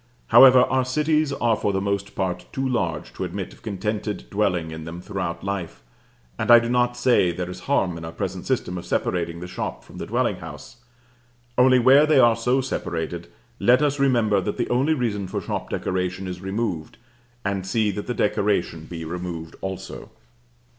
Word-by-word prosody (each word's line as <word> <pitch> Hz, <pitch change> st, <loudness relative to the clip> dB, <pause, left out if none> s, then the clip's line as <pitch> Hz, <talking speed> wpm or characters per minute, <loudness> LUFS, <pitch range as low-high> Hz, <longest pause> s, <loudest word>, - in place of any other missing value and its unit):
However, 125 Hz, +2 st, +9 dB
our 130 Hz, 0 st, +1 dB
cities 150 Hz, +3 st, +1 dB
are 120 Hz, -5 st, +1 dB
for 105 Hz, -, -1 dB
the 95 Hz, -, 0 dB
most 100 Hz, 0 st, -2 dB
part 90 Hz, -1 st, -2 dB
too 135 Hz, 0 st, -2 dB
large 85 Hz, -12 st, -2 dB
to -, -, -5 dB
admit -, -, -5 dB
of -, -, -19 dB
contented 105 Hz, 0 st, -3 dB
dwelling 90 Hz, -6 st, 0 dB
in 80 Hz, 0 st, -7 dB
them 80 Hz, +2 st, -7 dB
throughout 90 Hz, -3 st, -4 dB
life; 95 Hz, -9 st, -4 dB, 0.6 s
and -, -, -2 dB
I 120 Hz, -, +10 dB
do 115 Hz, 0 st, +1 dB
not 120 Hz, 0 st, +1 dB
say 120 Hz, -8 st, +3 dB
there 90 Hz, +1 st, -4 dB
is 90 Hz, -, -8 dB
harm 95 Hz, -11 st, +2 dB
in -, -, -9 dB
our 80 Hz, -, -6 dB
present -, -, -5 dB
system 90 Hz, 0 st, -1 dB
of -, -, -10 dB
separating 85 Hz, -1 st, -1 dB
the 90 Hz, -, -6 dB
shop 90 Hz, -, -5 dB
from -, -, -12 dB
the -, -, -5 dB
dwelling -, -, 0 dB
house; 120 Hz, -, -10 dB, 0.8 s
only 130 Hz, +1 st, +5 dB
where 135 Hz, +5 st, +6 dB
they 155 Hz, -, +4 dB
are 120 Hz, -2 st, +6 dB
so 125 Hz, +3 st, +1 dB
separated, 85 Hz, -8 st, -4 dB, 0.3 s
let 125 Hz, +4 st, +4 dB
us 145 Hz, -1 st, +1 dB
remember 115 Hz, -7 st, +3 dB
that 105 Hz, -, -3 dB
the -, -, -1 dB
only 135 Hz, +6 st, +2 dB
reason 105 Hz, -7 st, -2 dB
for -, -, -3 dB
shop -, -, -4 dB
decoration 95 Hz, +1 st, -2 dB
is 90 Hz, 0 st, -6 dB
removed, 95 Hz, -5 st, -3 dB, 0.5 s
and 95 Hz, -1 st, -2 dB
see 105 Hz, +1 st, +1 dB
that 105 Hz, +1 st, -6 dB
the 125 Hz, -, -2 dB
decoration 100 Hz, -6 st, 0 dB
be 80 Hz, -1 st, -7 dB
removed 85 Hz, -1 st, -6 dB
also. 95 Hz, -1 st, -6 dB
100 Hz, 190 wpm, -23 LUFS, 90-125 Hz, 0.8 s, I